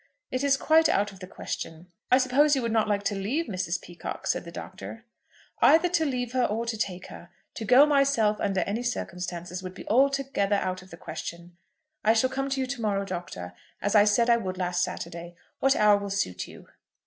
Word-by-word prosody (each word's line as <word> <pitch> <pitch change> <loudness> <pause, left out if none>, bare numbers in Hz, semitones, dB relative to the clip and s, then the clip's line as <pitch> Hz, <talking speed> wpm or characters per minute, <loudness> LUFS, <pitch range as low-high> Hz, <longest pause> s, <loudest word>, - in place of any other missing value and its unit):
"It 255 +1 -1
is 275 -1 +3
quite 320 +2 +4
out 205 +1 +1
of 195 - -14
the 185 - -8
question." 170 -1 -7 0.2
"I 255 - +6
suppose 275 +3 +4
you 265 - -1
would 230 - -1
not 220 -1 +2
like 205 -1 0
to 205 - 0
leave 220 +12 -1
Mrs. 185 -5 -2
Peacocke," 175 -1 -8
said - - -1
the 170 - -8
Doctor. 200 +6 -9 0.6
"Either 330 +3 +6
to 335 -2 +1
leave 250 -3 -2
her 255 -1 +1
or 225 +1 -1
to 230 -1 -2
take 185 -4 -3
her! 170 - -11 0.2
To 220 - -5
go 255 +7 +7
myself 275 -7 +3
under 195 -2 0
any 205 +6 -2
circumstances 180 -6 -4
would 185 0 -8
be - - -10
altogether 270 -5 +2
out 185 -2 -2
of 185 - -16
the 170 - -11
question. 170 0 -7 0.5
I 220 - +5
shall 255 +3 +2
come 270 +1 -2
to 270 0 -1
you 260 - +1
to 255 -2 -5
morrow, 200 -2 0
Doctor, 170 - -6 0.3
as 205 - -1
I 210 -1 +7
said 225 +3 +3
I 235 -1 +5
would 185 -5 -4
last 180 -1 -1
Saturday. 170 0 -5 0.2
What 270 0 +3
hour 210 -1 +5
will 200 0 -5
suit 90 - -2
you?" - - -14
210 Hz, 215 wpm, -27 LUFS, 185-255 Hz, 0.6 s, go